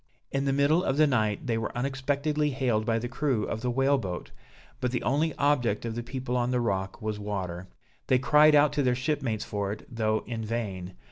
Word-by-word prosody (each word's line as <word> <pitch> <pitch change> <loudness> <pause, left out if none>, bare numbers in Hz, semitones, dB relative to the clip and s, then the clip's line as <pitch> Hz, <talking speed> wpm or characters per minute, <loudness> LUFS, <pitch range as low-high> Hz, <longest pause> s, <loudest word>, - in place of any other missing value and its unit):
In 135 - 0
the 135 - +2
middle 140 +5 +3
of 135 -4 0
the 155 - +6
night 110 -7 0
they 115 -3 0
were 115 - -4
unexpectedly 140 +3 0
hailed 125 -5 0
by 115 -1 +2
the 120 +2 -3
crew 125 -3 0
of 110 - -3
the 125 - -1
whale 135 +3 +2
boat; 90 -6 -5 0.5
but 125 -1 0
the 125 - -2
only 150 +5 +1
object 125 -7 +1
of 115 - -3
the 120 - -3
people 125 +1 -4
on 120 0 +1
the 125 -1 +1
rock 95 -2 -2
was 105 -1 -2
water; 95 -3 -4 0.4
they 130 - +4
cried 150 +3 +5
out 145 0 +5
to 145 - +1
their 125 -2 +2
shipmates 130 -5 -1
for 100 -1 -2
it, 105 - -7
though 110 -1 +1
in 115 -2 -4
vain. 105 - -4
125 Hz, 215 wpm, -28 LUFS, 110-140 Hz, 0.5 s, the